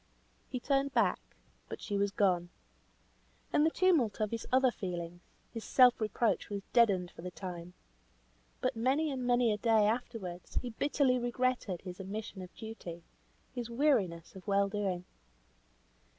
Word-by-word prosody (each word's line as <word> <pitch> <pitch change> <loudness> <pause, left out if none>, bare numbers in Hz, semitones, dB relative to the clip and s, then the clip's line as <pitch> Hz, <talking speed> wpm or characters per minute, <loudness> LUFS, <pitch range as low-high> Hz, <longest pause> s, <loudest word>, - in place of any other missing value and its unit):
He 255 - -3
turned 275 +1 0
back, - - +3 0.5
but - - -6
she 205 - -4
was 200 0 +2
gone. 185 -4 +1 1.0
In 295 - +4
the 320 - +5
tumult 320 - +2
of 215 -1 0
his 230 -1 -4
other 260 0 +5
feelings, 175 -4 -5 0.3
his 225 -2 -5
self 250 -3 +5
reproach 220 +1 0
was 200 -1 -4
deadened 195 -7 +4
for - - -11
the 180 - -5
time. 180 -1 -7 0.9
But 255 0 0
many 270 +7 +1
and 260 -2 -3
many 245 -2 +4
a 210 - -3
day 220 -1 +4
afterwards 210 -6 -3
he 245 - -1
bitterly 265 +1 +2
regretted 240 -6 -1
his 180 0 -7
omission 200 +1 -6
of 180 0 -9
duty; 190 -7 -8 0.5
his 240 -2 -4
weariness 225 - +1
of 190 +2 -11
well 200 0 +3
doing. 195 -3 -2
220 Hz, 150 wpm, -32 LUFS, 185-250 Hz, 1.0 s, the